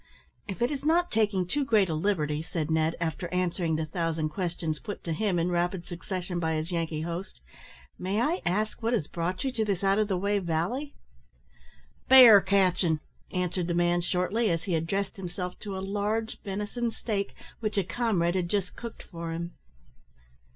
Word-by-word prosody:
"If 205 Hz, +4 st, -2 dB
it 245 Hz, -, +2 dB
is 280 Hz, -2 st, -3 dB
not 340 Hz, +3 st, +3 dB
taking 210 Hz, -4 st, +2 dB
too 285 Hz, +11 st, 0 dB
great 220 Hz, -6 st, +4 dB
a 165 Hz, -, -2 dB
liberty," 155 Hz, -3 st, 0 dB
said 160 Hz, -1 st, -3 dB
Ned, 160 Hz, +1 st, +2 dB
after 170 Hz, +1 st, -3 dB
answering 180 Hz, -2 st, 0 dB
the 160 Hz, 0 st, -1 dB
thousand 165 Hz, -1 st, -1 dB
questions 165 Hz, -2 st, -2 dB
put 205 Hz, -3 st, -7 dB
to 165 Hz, -, -2 dB
him 190 Hz, +2 st, 0 dB
in 170 Hz, +1 st, +1 dB
rapid 175 Hz, 0 st, 0 dB
succession 180 Hz, 0 st, -4 dB
by 160 Hz, -1 st, 0 dB
his 155 Hz, +3 st, -2 dB
Yankee 165 Hz, -2 st, -1 dB
host, 170 Hz, -, -5 dB, 0.6 s
"may 195 Hz, +3 st, -1 dB
I 310 Hz, +9 st, +1 dB
ask 210 Hz, +6 st, -1 dB
what 230 Hz, +2 st, +1 dB
has 210 Hz, -11 st, +1 dB
brought 175 Hz, +2 st, -2 dB
you 265 Hz, -, 0 dB
to 230 Hz, -3 st, 0 dB
this 200 Hz, -3 st, -1 dB
out 195 Hz, +1 st, +3 dB
of 215 Hz, -, +2 dB
the 190 Hz, -3 st, 0 dB
way 200 Hz, +2 st, +1 dB
valley?" 185 Hz, -, -2 dB, 1.1 s
"Bear 245 Hz, -6 st, +10 dB
catchin'," 185 Hz, -4 st, +2 dB, 0.3 s
answered 180 Hz, -1 st, -1 dB
the 170 Hz, -, 0 dB
man, 175 Hz, 0 st, +3 dB
shortly, 185 Hz, +6 st, +1 dB
as 165 Hz, -1 st, 0 dB
he 185 Hz, -, -2 dB
addressed 190 Hz, +6 st, -1 dB
himself 180 Hz, -1 st, -5 dB
to 200 Hz, -2 st, -5 dB
a 190 Hz, -, -4 dB
large 210 Hz, +3 st, -2 dB
venison 210 Hz, +4 st, -2 dB
steak, 205 Hz, -3 st, -3 dB, 0.2 s
which 215 Hz, -2 st, -2 dB
a 200 Hz, -, +3 dB
comrade 185 Hz, -4 st, +1 dB
had 180 Hz, -2 st, -1 dB
just 195 Hz, -2 st, -1 dB
cooked 235 Hz, -1 st, -8 dB
for 170 Hz, -1 st, -6 dB
him. 170 Hz, +1 st, -4 dB
185 Hz, 185 wpm, -28 LUFS, 170-210 Hz, 1.1 s, Bear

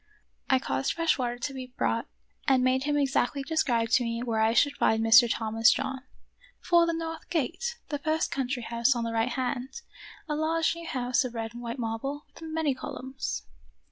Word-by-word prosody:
I 265 Hz, -, +5 dB
caused 130 Hz, -, -1 dB
fresh 330 Hz, -4 st, +1 dB
water 245 Hz, -1 st, -1 dB
to 270 Hz, +3 st, -4 dB
be 255 Hz, -1 st, -8 dB
brought 230 Hz, 0 st, 0 dB, 0.4 s
and 265 Hz, -2 st, +4 dB
made 260 Hz, +1 st, +2 dB
him 295 Hz, 0 st, +1 dB
exactly 275 Hz, 0 st, +1 dB
describe 250 Hz, -7 st, +1 dB
to 245 Hz, +1 st, +4 dB
me 230 Hz, 0 st, -2 dB
where 230 Hz, -3 st, -1 dB
I 220 Hz, 0 st, +4 dB
should 285 Hz, +4 st, +3 dB
find 220 Hz, 0 st, +2 dB
Mr. 230 Hz, +2 st, +7 dB
Thomas 225 Hz, 0 st, +3 dB
John. 265 Hz, -1 st, -2 dB, 0.3 s
" -, -, -29 dB
Before 340 Hz, -1 st, +4 dB
the 335 Hz, -, +1 dB
north 325 Hz, 0 st, -5 dB
gate; 360 Hz, -, -2 dB
the 290 Hz, -, -2 dB
first 310 Hz, +2 st, 0 dB
country 260 Hz, -2 st, -2 dB
house 235 Hz, +3 st, +2 dB
on 235 Hz, -, -1 dB
the 230 Hz, 0 st, -3 dB
right 225 Hz, +2 st, +1 dB
hand; 260 Hz, -, -3 dB, 0.5 s
a 300 Hz, -, -1 dB
large 320 Hz, +1 st, +1 dB
new 335 Hz, 0 st, -8 dB
house 250 Hz, +1 st, +1 dB
of 245 Hz, -2 st, -5 dB
red 225 Hz, 0 st, -4 dB
and 240 Hz, -, -8 dB
white 235 Hz, +1 st, -5 dB
marble, 250 Hz, +5 st, -3 dB
with -, -, -15 dB
many 320 Hz, -3 st, -1 dB
columns." 255 Hz, -, -5 dB
260 Hz, 200 wpm, -28 LUFS, 235-300 Hz, 0.5 s, Mr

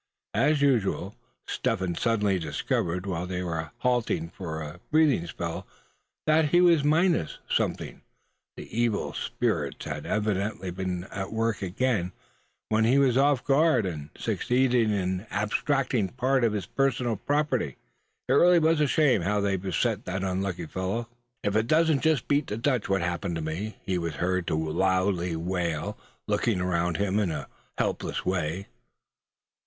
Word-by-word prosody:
As 145 Hz, +1 st, +3 dB
usual 105 Hz, -7 st, +1 dB, 0.3 s
Step -, -, -1 dB
Hen 95 Hz, -2 st, -2 dB
suddenly 105 Hz, -1 st, +1 dB
discovered, 85 Hz, +3 st, -1 dB
while 90 Hz, -2 st, -3 dB
they 90 Hz, 0 st, -3 dB
were 80 Hz, -3 st, -3 dB
halting 125 Hz, +8 st, 0 dB
for 80 Hz, -4 st, -6 dB
a 75 Hz, +3 st, -8 dB
breathing 150 Hz, -, +3 dB
spell, 85 Hz, 0 st, -5 dB, 0.6 s
that 155 Hz, 0 st, +4 dB
he 175 Hz, -, +5 dB
was 170 Hz, -4 st, +5 dB
minus 160 Hz, -, +2 dB
something. -, -, -1 dB, 0.6 s
The -, -, -7 dB
evil 115 Hz, -2 st, 0 dB
spirits -, -, -2 dB
had -, -, -5 dB
evidently 100 Hz, -3 st, -1 dB
been 90 Hz, -1 st, -3 dB
at 95 Hz, -1 st, -4 dB
work 115 Hz, -2 st, -1 dB
again, 95 Hz, -1 st, 0 dB, 0.6 s
when 110 Hz, 0 st, +3 dB
he 120 Hz, +5 st, +4 dB
was 135 Hz, -3 st, +4 dB
off 140 Hz, -1 st, +3 dB
his -, -, -34 dB
guard, 140 Hz, -5 st, +4 dB
and 75 Hz, -5 st, -5 dB
succeeded 125 Hz, -2 st, +2 dB
in 95 Hz, 0 st, -1 dB
abstracting 115 Hz, +2 st, 0 dB
part 130 Hz, +1 st, +1 dB
of 115 Hz, -2 st, +3 dB
his 100 Hz, -4 st, -2 dB
personal 125 Hz, -1 st, 0 dB
property. 140 Hz, -, -1 dB, 0.5 s
It 130 Hz, -, +2 dB
really 175 Hz, +5 st, +6 dB
was 160 Hz, -1 st, +3 dB
a 150 Hz, -, +4 dB
shame 135 Hz, -, +3 dB
how 105 Hz, +4 st, +1 dB
they 100 Hz, -1 st, +1 dB
beset 95 Hz, -3 st, -1 dB
that 95 Hz, +1 st, -3 dB
unlucky 95 Hz, -1 st, -2 dB
fellow. 95 Hz, +8 st, -3 dB, 0.3 s
"If 100 Hz, -, 0 dB
it 110 Hz, +1 st, +2 dB
don't 155 Hz, -1 st, +3 dB
just 155 Hz, -4 st, +2 dB
beat 145 Hz, 0 st, +2 dB
the 105 Hz, -, -3 dB
Dutch 125 Hz, -1 st, 0 dB
what 95 Hz, -2 st, +2 dB
happens 85 Hz, +1 st, -2 dB
to 80 Hz, -, -3 dB
me?" 85 Hz, +8 st, -4 dB
he 95 Hz, -2 st, -1 dB
was 85 Hz, -3 st, -3 dB
heard 90 Hz, +2 st, -1 dB
to -, -, +1 dB
loudly 90 Hz, +2 st, +1 dB
wail, 85 Hz, -2 st, -2 dB, 0.3 s
looking 110 Hz, -6 st, +1 dB
around 90 Hz, -1 st, 0 dB
him 100 Hz, 0 st, +1 dB
in 100 Hz, -4 st, +1 dB
a 75 Hz, -4 st, -4 dB, 0.3 s
helpless -, -, -2 dB
way. 90 Hz, 0 st, -1 dB
100 Hz, 160 wpm, -27 LUFS, 90-130 Hz, 0.6 s, really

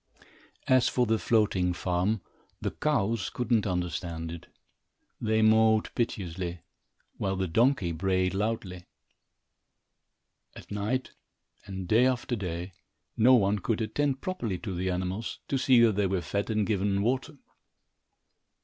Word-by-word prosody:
As 130 Hz, -1 st, +4 dB
for 125 Hz, -, +1 dB
the 110 Hz, -1 st, +1 dB
floating 100 Hz, -6 st, +2 dB
farm, 90 Hz, +4 st, 0 dB, 0.4 s
the -, -, -2 dB
cows 115 Hz, -8 st, 0 dB
could 125 Hz, 0 st, -4 dB
not 110 Hz, -3 st, +3 dB
understand 85 Hz, -2 st, -3 dB
it. 85 Hz, -1 st, -9 dB, 0.7 s
They 110 Hz, -1 st, +2 dB
mooed 110 Hz, 0 st, +4 dB
piteously, 90 Hz, -6 st, -3 dB, 0.6 s
while 95 Hz, 0 st, -1 dB
the 95 Hz, 0 st, -1 dB
donkey 110 Hz, 0 st, +2 dB
brayed 95 Hz, +2 st, 0 dB
loudly. 95 Hz, -3 st, -3 dB, 1.7 s
At -, -, -12 dB
night, 105 Hz, +6 st, -2 dB, 0.6 s
and 95 Hz, -2 st, -6 dB
day 115 Hz, +7 st, +5 dB
after 125 Hz, -1 st, -1 dB
day, 90 Hz, -2 st, -5 dB, 0.4 s
no 125 Hz, +3 st, +6 dB
one 105 Hz, -2 st, +2 dB
could 105 Hz, +4 st, -1 dB
attend 135 Hz, +5 st, -1 dB
properly 120 Hz, -, -3 dB
to 100 Hz, 0 st, -5 dB
the 90 Hz, +1 st, -2 dB
animals, 95 Hz, +4 st, -3 dB
to 135 Hz, -, 0 dB
see 130 Hz, -1 st, +5 dB
that 115 Hz, -2 st, +5 dB
they 100 Hz, -1 st, +2 dB
were 95 Hz, -1 st, -1 dB
fed 100 Hz, +5 st, -2 dB
and 110 Hz, -2 st, +1 dB
given 100 Hz, -1 st, 0 dB
water. 130 Hz, +6 st, -1 dB
105 Hz, 135 wpm, -28 LUFS, 90-115 Hz, 1.7 s, no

